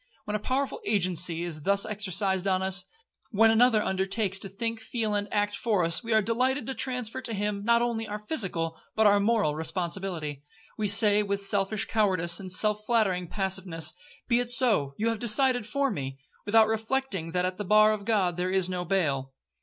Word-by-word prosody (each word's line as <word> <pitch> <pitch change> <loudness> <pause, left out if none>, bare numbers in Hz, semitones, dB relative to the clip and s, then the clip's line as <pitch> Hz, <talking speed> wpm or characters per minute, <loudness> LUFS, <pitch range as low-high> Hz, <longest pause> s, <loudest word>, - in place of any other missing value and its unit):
When 210 - -3
a - - -1
powerful 270 - -2
agency 180 - 0
is 165 -3 -5
thus 200 +5 +1
exercised 195 -2 -2
on 190 -1 +1
us,—when 220 - -1
another 225 -1 +4
undertakes 195 +1 -1
to 195 - -7
think, 230 +3 -4
feel, 220 -1 -3
and 205 0 -2
act 205 0 0
for 210 -6 0
us, 170 +7 +1
we 230 - -5
are 220 -1 +3
delighted 255 +5 0
to 265 - -4
transfer 250 -1 -3
to 230 -4 -4
him, 205 0 -2
not 235 +2 +3
only 225 -2 -2
our 210 - -4
physical, 190 - -2 0.2
but 220 - +2
our 205 0 +5
moral 205 -7 +1
responsibility. 165 -2 -3 0.3
We 215 -2 -1
say, 205 +1 +6
with 200 -1 -2
selfish 200 +1 0
cowardice, 185 -6 +1
and 190 -2 -3
self 210 +3 +3
flattering 205 -6 +1
passiveness, 190 -4 -3 0.3
'Be 235 -1 +3
it 245 -1 -2
so—you 220 - +2
have 225 -2 -2
decided 245 0 +2
for 275 +4 0
me,'—without 145 +11 0
reflecting 220 -5 -2
that 180 0 +1
at 185 0 -3
the 210 - -4
bar 215 +2 +5
of 210 -1 -5
God 195 -5 0
there 180 +1 -1
is 190 -1 +1
no 180 -1 -3
bail. 145 -8 -1
205 Hz, 185 wpm, -27 LUFS, 185-225 Hz, 0.3 s, say